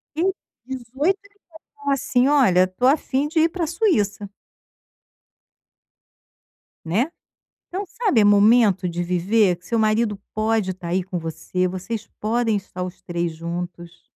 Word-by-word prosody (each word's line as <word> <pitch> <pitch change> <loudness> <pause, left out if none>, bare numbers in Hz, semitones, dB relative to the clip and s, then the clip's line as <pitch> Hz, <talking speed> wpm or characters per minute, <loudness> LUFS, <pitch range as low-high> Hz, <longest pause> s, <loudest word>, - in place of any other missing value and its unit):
E 330 - 0 0.4
18 265 +9 -1
ele 405 0 -23 0.4
falou 285 -1 0
assim: 255 -1 +2
"Olha, 195 -11 +4
tô 185 +7 -2
a 285 +4 +5
fim 275 +1 -1
de 320 +2 0
ir 330 - +4
para 335 -2 -2
Suíça". 210 - 0 2.6
Né? 225 - 0 0.6
Então, 385 +3 -4
sabe, 405 - +1
é 205 - +5
momento 205 -2 +5
de 175 0 -3
viver, 180 +2 +2
que 180 - -21
seu 230 +2 0
marido 215 -1 +1
pode 215 -2 +1
estar 180 -1 -8
aí 185 +2 +1
com 180 0 -4
você, 165 +3 -2
vocês 190 +5 -5
podem 225 0 +1
estar 190 -2 -6
os 180 0 -6
3 175 -2 -2
juntos. 170 +1 -6
210 Hz, 145 wpm, -22 LUFS, 180-265 Hz, 2.6 s, a